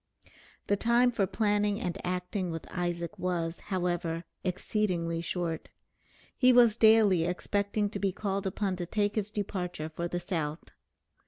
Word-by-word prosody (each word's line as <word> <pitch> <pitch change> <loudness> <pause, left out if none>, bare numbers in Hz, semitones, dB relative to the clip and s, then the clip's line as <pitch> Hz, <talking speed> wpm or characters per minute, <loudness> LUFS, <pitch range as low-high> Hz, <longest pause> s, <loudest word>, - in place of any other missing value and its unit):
The 205 - +2
time 240 +3 +4
for 200 -5 +1
planning 205 0 +1
and 180 -8 -2
acting 180 +1 -2
with 165 -1 -5
Isaac 175 +2 -3
was, 175 -2 -1
however, 175 -3 -1 0.2
exceedingly 180 -3 -1
short. 170 -1 -3 0.7
He 255 -1 +5
was 240 -3 +6
daily 220 -6 +5
expecting 200 +3 0
to 200 - -4
be 195 -1 +1
called 195 0 -2
upon 190 -1 -1
to 175 -1 -4
take 205 +2 0
his 210 -2 -1
departure 180 -6 -3
for 170 +2 -3
the 175 0 -2
South. 160 -3 -3
185 Hz, 145 wpm, -30 LUFS, 175-210 Hz, 0.7 s, was